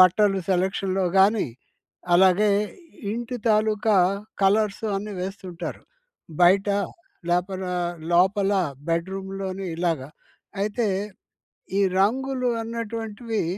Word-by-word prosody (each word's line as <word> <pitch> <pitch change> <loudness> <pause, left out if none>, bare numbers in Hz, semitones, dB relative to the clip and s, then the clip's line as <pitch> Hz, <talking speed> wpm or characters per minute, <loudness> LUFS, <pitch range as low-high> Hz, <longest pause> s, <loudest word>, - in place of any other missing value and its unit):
బట్టలు 195 +2 +5
సెలక్షన్‌లో 190 +1 +1
గానీ, 200 0 +4 0.7
అలాగే 190 +3 +5 0.6
ఇంటి 240 +2 -4
తాలూకా 215 -1 +3 0.5
కలర్సు 210 +2 +2
అన్ని 205 0 -5
వేస్తుంటారు. 185 -2 -6 0.6
బయట, 195 +3 +5 0.6
లోపలా 180 0 -1 0.4
లోపల 195 +3 +3 0.4
బెడ్‍రూమ్‍లోని 190 +2 -3
ఇలాగా. 165 -6 -1 0.5
అయితే 215 +2 0 0.9
ఈ - - +4 0.2
రంగులు 255 +4 +1 0.2
అన్నటువంటివి 225 -1 -3
195 Hz, 80 wpm, -24 LUFS, 185-215 Hz, 0.9 s, బట్టలు